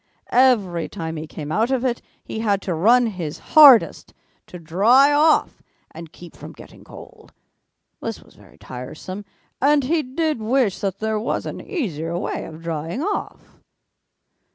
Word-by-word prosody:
Every 210 Hz, -10 st, +2 dB
time 165 Hz, -4 st, -6 dB
he 155 Hz, 0 st, -6 dB
came 150 Hz, -1 st, -8 dB
out 225 Hz, +7 st, +1 dB
of 265 Hz, -1 st, -1 dB
it, 240 Hz, -2 st, -1 dB, 0.2 s
he 220 Hz, -, -6 dB
had 205 Hz, -3 st, 0 dB
to 185 Hz, -, -2 dB
run 235 Hz, +9 st, +4 dB
his 180 Hz, -9 st, -5 dB, 0.2 s
hardest 285 Hz, -7 st, +6 dB, 0.3 s
to 180 Hz, -, -10 dB
dry 220 Hz, -, +3 dB
off 305 Hz, +2 st, +2 dB, 0.3 s
and 165 Hz, 0 st, -11 dB
keep 175 Hz, -2 st, -14 dB
from -, -, -11 dB
getting -, -, -15 dB
cold. -, -, -15 dB, 0.7 s
This -, -, -5 dB
was -, -, -22 dB
very -, -, -20 dB
tiresome 155 Hz, +10 st, -9 dB, 0.4 s
and 285 Hz, +1 st, +3 dB
he 315 Hz, +5 st, 0 dB
did 300 Hz, +1 st, -2 dB
wish 230 Hz, -2 st, 0 dB
that 195 Hz, -1 st, -3 dB
there 220 Hz, 0 st, -1 dB
was 220 Hz, -, -3 dB
an -, -, -6 dB
easier 170 Hz, -, -4 dB
way 185 Hz, -, -4 dB
of 160 Hz, +1 st, -11 dB
drying 165 Hz, -, -4 dB
off. 410 Hz, +2 st, -5 dB
215 Hz, 155 wpm, -21 LUFS, 165-260 Hz, 0.7 s, hardest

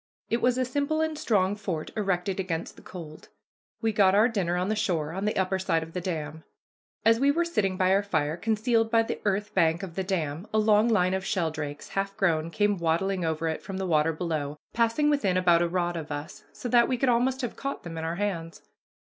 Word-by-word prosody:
It 230 Hz, -, +1 dB
was 250 Hz, 0 st, +2 dB
a 255 Hz, -, +1 dB
simple 285 Hz, +4 st, -1 dB
and 315 Hz, 0 st, 0 dB
strong 205 Hz, -8 st, +1 dB
fort 185 Hz, -7 st, -4 dB
erected 195 Hz, -2 st, -1 dB
against 170 Hz, -3 st, -3 dB
the -, -, -15 dB
cold. 160 Hz, -4 st, -10 dB, 0.5 s
We 225 Hz, -1 st, +1 dB
got 195 Hz, -2 st, +4 dB
our 215 Hz, +3 st, +6 dB
dinner 185 Hz, -7 st, -1 dB
on 180 Hz, +1 st, 0 dB
the 215 Hz, -, 0 dB
shore, 175 Hz, -8 st, -1 dB
on 190 Hz, +4 st, -3 dB
the 210 Hz, -, 0 dB
upper 190 Hz, 0 st, +1 dB
side 165 Hz, -3 st, 0 dB
of 165 Hz, 0 st, -11 dB
the 180 Hz, -, -3 dB
dam. 160 Hz, -3 st, -4 dB, 0.6 s
As 225 Hz, 0 st, +5 dB
we 275 Hz, +2 st, +4 dB
were 335 Hz, +4 st, +2 dB
sitting 200 Hz, -, 0 dB
by 185 Hz, 0 st, +3 dB
our 195 Hz, -, +4 dB
fire, 155 Hz, -6 st, -1 dB
concealed 225 Hz, +4 st, +1 dB
by 225 Hz, 0 st, +4 dB
the -, -, -5 dB
earth 205 Hz, +1 st, 0 dB
bank 165 Hz, +3 st, +2 dB
of 185 Hz, -4 st, -6 dB
the 190 Hz, -, -2 dB
dam, 170 Hz, -1 st, -2 dB
a 220 Hz, -, +1 dB
long 215 Hz, +1 st, +4 dB
line 185 Hz, -4 st, +3 dB
of 190 Hz, 0 st, -1 dB
sheldrakes, 155 Hz, -6 st, -3 dB
half 195 Hz, +1 st, -3 dB
grown, 165 Hz, -5 st, +1 dB
came 205 Hz, +2 st, +1 dB
waddling 175 Hz, +3 st, 0 dB
over 160 Hz, 0 st, -1 dB
it 160 Hz, -, -2 dB
from 195 Hz, -2 st, -6 dB
the 190 Hz, -, -2 dB
water 160 Hz, -2 st, +2 dB
below, 155 Hz, -3 st, -3 dB, 0.2 s
passing 235 Hz, +6 st, +2 dB
within 200 Hz, -11 st, +1 dB
about 175 Hz, -2 st, +4 dB
a 175 Hz, -, +1 dB
rod 175 Hz, -1 st, -1 dB
of 155 Hz, -2 st, -6 dB
us, 145 Hz, +4 st, -6 dB
so -, -, -6 dB
that 240 Hz, 0 st, +4 dB
we 255 Hz, -, 0 dB
could 265 Hz, -, +1 dB
almost 250 Hz, +2 st, +2 dB
have 245 Hz, -3 st, -4 dB
caught 275 Hz, 0 st, -5 dB
them 170 Hz, -1 st, -7 dB
in 160 Hz, -, -4 dB
our 165 Hz, +1 st, -2 dB
hands. 175 Hz, -5 st, -3 dB
190 Hz, 230 wpm, -27 LUFS, 165-220 Hz, 0.6 s, our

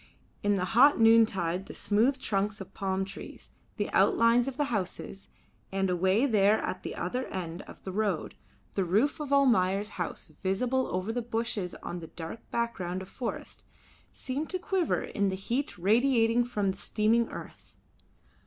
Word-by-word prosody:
In 205 Hz, 0 st, +2 dB
the 180 Hz, -2 st, 0 dB
hot 255 Hz, +9 st, +5 dB
noontide 200 Hz, -6 st, +4 dB
the -, -, -8 dB
smooth 230 Hz, +6 st, +2 dB
trunks 205 Hz, -1 st, -1 dB
of 195 Hz, -1 st, -9 dB
palm 190 Hz, -1 st, -1 dB
trees, 195 Hz, -, -10 dB, 0.3 s
the -, -, -2 dB
outlines 230 Hz, +2 st, +4 dB
of 270 Hz, -1 st, -4 dB
the 295 Hz, -, +2 dB
houses, 195 Hz, 0 st, -4 dB, 0.4 s
and 195 Hz, -1 st, 0 dB
away 190 Hz, +7 st, +3 dB
there 210 Hz, -4 st, +4 dB
at -, -, -3 dB
the -, -, -6 dB
other 255 Hz, +1 st, -3 dB
end 175 Hz, -1 st, -5 dB
of -, -, -13 dB
the 190 Hz, -, -5 dB
road 200 Hz, -4 st, -1 dB, 0.4 s
the 195 Hz, -, +1 dB
roof 210 Hz, -, +1 dB
of 295 Hz, -2 st, -5 dB
Almayer's 210 Hz, -8 st, +3 dB
house 165 Hz, -, -5 dB
visible 250 Hz, +7 st, 0 dB
over 185 Hz, +4 st, -2 dB
the 245 Hz, +2 st, -2 dB
bushes 225 Hz, -5 st, -2 dB
on 175 Hz, -, -4 dB
the 165 Hz, -, -8 dB
dark 165 Hz, +7 st, -7 dB
background 190 Hz, -6 st, -2 dB
of 185 Hz, -, -13 dB
forest, 245 Hz, -, -5 dB, 0.5 s
seemed 275 Hz, +4 st, -4 dB
to 370 Hz, -, -1 dB
quiver 365 Hz, -2 st, 0 dB
in 200 Hz, -1 st, 0 dB
the 190 Hz, -, -2 dB
heat 235 Hz, +8 st, -3 dB
radiating 230 Hz, +4 st, +3 dB
from 205 Hz, -5 st, 0 dB
the 190 Hz, -, -9 dB
steaming 225 Hz, +3 st, +1 dB
earth. -, -, -10 dB
210 Hz, 165 wpm, -29 LUFS, 190-240 Hz, 0.5 s, hot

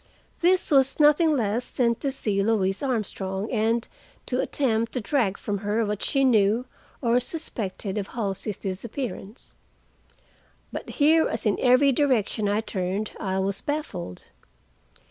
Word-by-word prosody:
This 360 Hz, 0 st, +2 dB
was 270 Hz, 0 st, +3 dB
nothing 300 Hz, +1 st, +5 dB
less 230 Hz, +1 st, -1 dB
than 235 Hz, -2 st, +2 dB
to 275 Hz, -, -2 dB
see 210 Hz, -7 st, 0 dB
Louise 195 Hz, -2 st, +1 dB
Armstrong, 210 Hz, -6 st, -2 dB
and 230 Hz, 0 st, +1 dB, 0.4 s
to 255 Hz, 0 st, 0 dB
attempt 230 Hz, -5 st, 0 dB
to 255 Hz, -, -1 dB
drag 210 Hz, -4 st, 0 dB
from 205 Hz, -1 st, -3 dB
her 215 Hz, +2 st, 0 dB
what 210 Hz, -1 st, -3 dB
she 275 Hz, -1 st, +1 dB
knew, 225 Hz, -1 st, +3 dB, 0.4 s
or 235 Hz, +1 st, +3 dB
suspected, 215 Hz, -, -3 dB
of 200 Hz, -, -4 dB
Halsey's 205 Hz, -2 st, -4 dB
disappearance. 210 Hz, +3 st, -6 dB, 1.2 s
But -, -, -6 dB
here, 320 Hz, +2 st, +5 dB
as -, -, -4 dB
in 210 Hz, -, +1 dB
every 255 Hz, +2 st, +5 dB
direction 235 Hz, -6 st, +1 dB
I 205 Hz, +2 st, +1 dB
turned, 195 Hz, 0 st, -3 dB
I 190 Hz, -2 st, -2 dB
was 195 Hz, +1 st, -1 dB
baffled. 205 Hz, -, -4 dB
225 Hz, 140 wpm, -25 LUFS, 200-265 Hz, 1.2 s, nothing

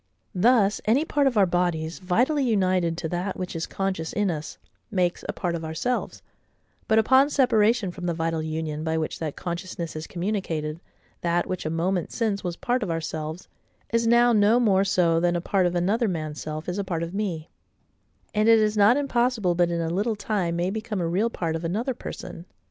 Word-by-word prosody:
Thus 210 Hz, +1 st, +3 dB
any 255 Hz, +8 st, +3 dB
part 290 Hz, -4 st, +2 dB
of 245 Hz, -4 st, 0 dB
our 200 Hz, -, +6 dB
bodies, 175 Hz, -2 st, -1 dB
vitally 245 Hz, -, +1 dB
united 185 Hz, -7 st, +1 dB
to 165 Hz, -2 st, -3 dB
that 180 Hz, +3 st, -3 dB
which 185 Hz, -1 st, -5 dB
is 165 Hz, -, -3 dB
conscious 190 Hz, -4 st, -2 dB
in 205 Hz, -3 st, 0 dB
us, 155 Hz, -2 st, -6 dB, 0.3 s
makes 180 Hz, -3 st, 0 dB
a -, -, +3 dB
part 175 Hz, -1 st, -3 dB
of 165 Hz, -1 st, -4 dB
ourselves: 160 Hz, +11 st, -3 dB, 0.6 s
but 220 Hz, -, +3 dB
upon 260 Hz, +5 st, +5 dB
separation 230 Hz, -6 st, +3 dB
from 180 Hz, 0 st, -6 dB
the 170 Hz, -, +1 dB
vital 165 Hz, 0 st, -1 dB
union 155 Hz, -1 st, -3 dB
by 160 Hz, 0 st, 0 dB
which 155 Hz, -1 st, -3 dB
that 155 Hz, -3 st, -4 dB
consciousness 170 Hz, -2 st, -5 dB
is 155 Hz, +1 st, -5 dB
communicated, 170 Hz, -5 st, -3 dB, 0.4 s
that 175 Hz, 0 st, +1 dB
which 185 Hz, -4 st, -4 dB
a -, -, -1 dB
moment 175 Hz, +2 st, -1 dB
since 215 Hz, -4 st, -1 dB
was 175 Hz, -2 st, -3 dB
part 250 Hz, +2 st, -1 dB
of 205 Hz, -, -2 dB
ourselves, 160 Hz, +1 st, -4 dB, 0.5 s
is 230 Hz, 0 st, +2 dB
now 240 Hz, +1 st, +5 dB
no 215 Hz, +2 st, +4 dB
more 200 Hz, -5 st, +3 dB
so 175 Hz, -4 st, +2 dB
than 175 Hz, +1 st, +1 dB
a -, -, +1 dB
part 185 Hz, +1 st, +1 dB
of 175 Hz, -, -3 dB
another 205 Hz, +7 st, +1 dB
man's 155 Hz, -5 st, -4 dB
self 155 Hz, +1 st, -5 dB
is 180 Hz, +3 st, -2 dB
a -, -, 0 dB
part 170 Hz, -4 st, -2 dB
of 170 Hz, +2 st, -5 dB
me: 185 Hz, -6 st, -3 dB, 0.8 s
and 215 Hz, +1 st, +3 dB
it 225 Hz, -, +8 dB
is 215 Hz, -1 st, +2 dB
not 210 Hz, +5 st, +5 dB
impossible 245 Hz, -8 st, +1 dB
but 175 Hz, 0 st, +2 dB
in 170 Hz, -1 st, -1 dB
a 165 Hz, -, -1 dB
little 210 Hz, +5 st, 0 dB
time 200 Hz, -5 st, -1 dB
may 175 Hz, +2 st, 0 dB
become 215 Hz, -1 st, -3 dB
a 175 Hz, -, 0 dB
real 195 Hz, +7 st, +1 dB
part 165 Hz, -7 st, -3 dB
of 165 Hz, -, -4 dB
another 220 Hz, +10 st, -1 dB
person. 175 Hz, -6 st, -8 dB
185 Hz, 205 wpm, -25 LUFS, 165-215 Hz, 0.8 s, it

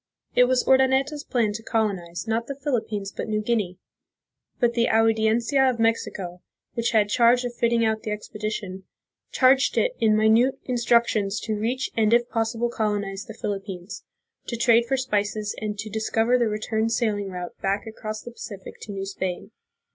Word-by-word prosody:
It 250 Hz, -, +6 dB
was 255 Hz, 0 st, +1 dB
Urdaneta's 265 Hz, +3 st, +3 dB
plan 230 Hz, -7 st, 0 dB
to 220 Hz, -, -5 dB
colonize, 200 Hz, -5 st, -2 dB
not 225 Hz, +1 st, -1 dB
the 280 Hz, -, -4 dB
Philippines, 220 Hz, -8 st, -2 dB
but -, -, -4 dB
New 215 Hz, -1 st, 0 dB
Guinea; 210 Hz, -5 st, -1 dB, 0.8 s
but 240 Hz, -2 st, +2 dB
the 235 Hz, 0 st, +2 dB
Audiencia 225 Hz, +4 st, +3 dB
of 250 Hz, -, -1 dB
Mexico, 195 Hz, -6 st, -1 dB, 0.3 s
which 235 Hz, 0 st, 0 dB
had 215 Hz, -3 st, +3 dB
charge 240 Hz, +3 st, +4 dB
of 245 Hz, -, -3 dB
fitting 235 Hz, -1 st, +2 dB
out 220 Hz, 0 st, 0 dB
the 225 Hz, -, -5 dB
expedition, 210 Hz, -3 st, -5 dB, 0.5 s
charged 265 Hz, +1 st, +4 dB
it -, -, +2 dB
in 215 Hz, -1 st, +4 dB
minute 225 Hz, +4 st, +4 dB
instructions 235 Hz, -4 st, +2 dB
to 220 Hz, -, -2 dB
reach 235 Hz, +5 st, -2 dB
and 225 Hz, 0 st, +4 dB
if 240 Hz, 0 st, +2 dB
possible 230 Hz, +1 st, -1 dB
colonize 205 Hz, -3 st, -2 dB
the 220 Hz, -4 st, -9 dB
Philip 200 Hz, -1 st, -3 dB
pines, 190 Hz, +2 st, -7 dB, 0.4 s
to 235 Hz, -, -3 dB
trade 235 Hz, 0 st, +4 dB
for 270 Hz, -, +1 dB
spices 210 Hz, -4 st, -1 dB
and 210 Hz, -1 st, -4 dB
to 205 Hz, +2 st, -5 dB
discover 225 Hz, +2 st, +1 dB
the 240 Hz, -2 st, +2 dB
return 220 Hz, +1 st, -1 dB
sail 225 Hz, -2 st, +1 dB
ing 200 Hz, -1 st, -4 dB
route 180 Hz, -1 st, -6 dB
back 195 Hz, +1 st, -1 dB
across 215 Hz, -1 st, -6 dB
the 240 Hz, -, -8 dB
Pacific 200 Hz, -4 st, -9 dB
to 210 Hz, -, -7 dB
New 195 Hz, -1 st, -4 dB
Spain. 190 Hz, 0 st, -4 dB
220 Hz, 175 wpm, -24 LUFS, 205-235 Hz, 0.8 s, It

